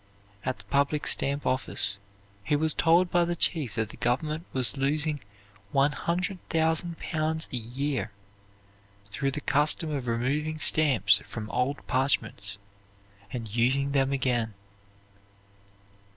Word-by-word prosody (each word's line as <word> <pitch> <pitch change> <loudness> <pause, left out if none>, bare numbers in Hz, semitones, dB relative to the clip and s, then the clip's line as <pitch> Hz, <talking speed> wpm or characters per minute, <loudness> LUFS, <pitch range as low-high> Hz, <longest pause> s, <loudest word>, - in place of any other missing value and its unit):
At 130 0 -2
the 100 - -11
public 140 +6 0
stamp 140 +1 +2
office 105 -6 +2 0.4
he 145 - +1
was 155 +1 +3
told 170 +2 +3
by 175 -1 +3
the 170 0 -1
chief 150 - 0
that 110 -1 -1
the - - -11
government 155 +7 -1
was 130 0 +4
losing 150 +2 0 0.5
100,000 165 +2 0
pounds 160 0 -2
a - - +2
year 120 -1 -2 1.0
through 135 +6 -1
the 150 +2 -4
custom 150 +3 +1
of 135 -4 -3
removing 140 +7 -1
stamps 125 -12 +4
from 110 -2 -7
old 130 +6 -1
parchments 110 -7 0 0.7
and 115 -4 -6
using 135 +4 +2
them 135 -1 +1
again. 120 -5 0
140 Hz, 125 wpm, -27 LUFS, 120-155 Hz, 1.0 s, was